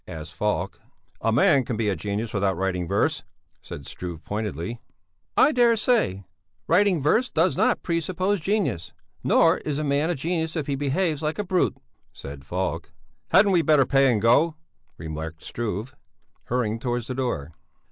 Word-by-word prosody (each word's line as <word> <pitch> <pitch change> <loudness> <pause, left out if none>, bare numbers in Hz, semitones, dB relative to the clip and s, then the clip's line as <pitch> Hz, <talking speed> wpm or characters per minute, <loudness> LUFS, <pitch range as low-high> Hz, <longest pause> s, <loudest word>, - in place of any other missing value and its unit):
asked 80 -2 -8
Falk. 105 +5 -2 0.4
"A 115 - +1
man 140 - +4
can 120 -2 -3
be 110 -1 0
a 100 - +1
genius 105 +6 -3
without 100 -3 0
writing 90 -2 -1
verse," - - +1 0.4
said 70 - -9
Struve 85 0 -7
pointedly. 105 0 -4 0.6
"I - - +6
dare 240 -4 +4
say; 210 - +1 0.4
writing 185 0 +3
verse 220 - +2
does 165 +3 +2
not - - +1
pre 170 -1 0
suppose 185 +4 -1
genius, 185 - -1 0.3
nor - - +4
is 150 -2 -3
a 155 - -1
man 145 +2 +1
a 175 - 0
genius 160 +2 -2
if 155 -4 -2
he 140 - -2
behaves 145 +3 0
like 155 0 -2
a 210 - -1
brute," 185 -2 +1 0.3
said 70 -1 -10
Falk. 90 +3 -3 0.4
"Hadn't 200 +1 +5
we 175 -3 +4
better 150 -3 +4
pay 135 0 +4
and 110 - +1
go?" 140 +9 +3 0.4
remarked 80 0 -6
Struve, 115 +2 -4 0.5
hurrying 115 -2 -1
towards 120 -1 -2
the 130 - -4
door. 120 - -3
130 Hz, 165 wpm, -25 LUFS, -, 0.6 s, I